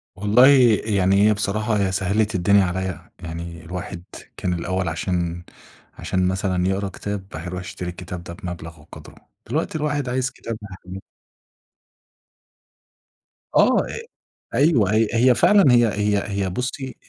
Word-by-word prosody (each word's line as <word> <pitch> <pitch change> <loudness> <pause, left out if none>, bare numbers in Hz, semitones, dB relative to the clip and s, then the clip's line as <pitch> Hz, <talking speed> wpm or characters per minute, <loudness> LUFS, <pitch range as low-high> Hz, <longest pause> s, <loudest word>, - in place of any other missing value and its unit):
والله، 105 +6 +5 0.4
يعني 100 -1 +3
هي 110 - +4
بصراحة 105 -1 0
سهَّلِت 100 +3 0
الدنيا 100 +2 +4
عليّا، 95 +1 -4
يعني 85 -1 -7
الواحد 90 0 -6 0.3
كان 90 - -1
الأول 95 +1 -2
عشان 85 +1 -2 0.5
عشان 95 0 -1
مثلًا 95 -1 0
يقرَأ 95 +1 -1
كتاب، 100 0 -5
الواحد 80 +2 -6
يرُوح 90 +1 -5
يشتري 90 0 -6
الكتاب 90 0 -7
ده 85 - -8
بمبلَغ 85 -4 -8
وقدره، 75 - -13 0.3
دلوقتي - - -1
الواحد 150 -3 -1
عايز 130 +1 0
كتاب 115 -1 -6
هيحمِّله. 95 +1 -9 2.5
آه، - - +5
أ - - -6 0.5
أيوه 120 - +3
هي 110 0 +3
هي 125 +2 +4
فعلًا 200 - +5
هي 120 -1 +5
هي 105 -1 0 0.2
هي 95 - -1
بُصي، 125 +5 -4
95 Hz, 135 wpm, -22 LUFS, 90-110 Hz, 2.5 s, والله